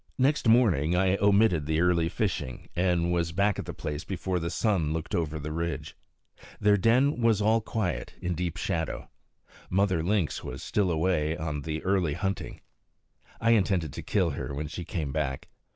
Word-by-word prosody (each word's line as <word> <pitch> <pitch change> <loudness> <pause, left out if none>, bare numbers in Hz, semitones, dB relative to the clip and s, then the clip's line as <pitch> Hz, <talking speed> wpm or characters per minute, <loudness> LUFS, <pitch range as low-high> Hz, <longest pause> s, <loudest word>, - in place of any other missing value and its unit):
Next 135 0 +2
morning 90 - +4
I 95 +1 +3
omitted 100 -7 +3
the 80 0 +1
early 85 -1 +2
fishing, 90 - -3
and 85 -1 +1
was 85 -1 0
back 100 +3 +1
at - - -4
the - - -6
place 75 +1 -4
before 95 -1 -2
the 85 0 -3
sun 85 -5 0
looked 80 -1 -4
over 80 -2 -1
the 75 +1 -5
ridge. 85 +1 -3 0.6
Their 105 0 +4
den 120 +7 +3
was 115 -3 +3
all 110 +2 +3
quiet, 110 -3 -3
in 90 - -2
deep 85 -1 -3
shadow. 80 -3 -3 0.6
Mother 95 -2 +2
Lynx 90 -1 0
was 65 +5 -6
still 100 -3 +1
away 80 -1 +1
on 80 -3 -3
the 80 +2 -4
early 95 -5 +1
hunting. 95 +2 -3 0.8
I 115 - +3
intended 95 -8 +2
to - - -6
kill 90 -5 +1
her 70 0 -5
when 75 +2 -3
she 85 +3 -6
came 75 -5 -3
back. 70 -3 -3
90 Hz, 175 wpm, -28 LUFS, 80-100 Hz, 0.8 s, morning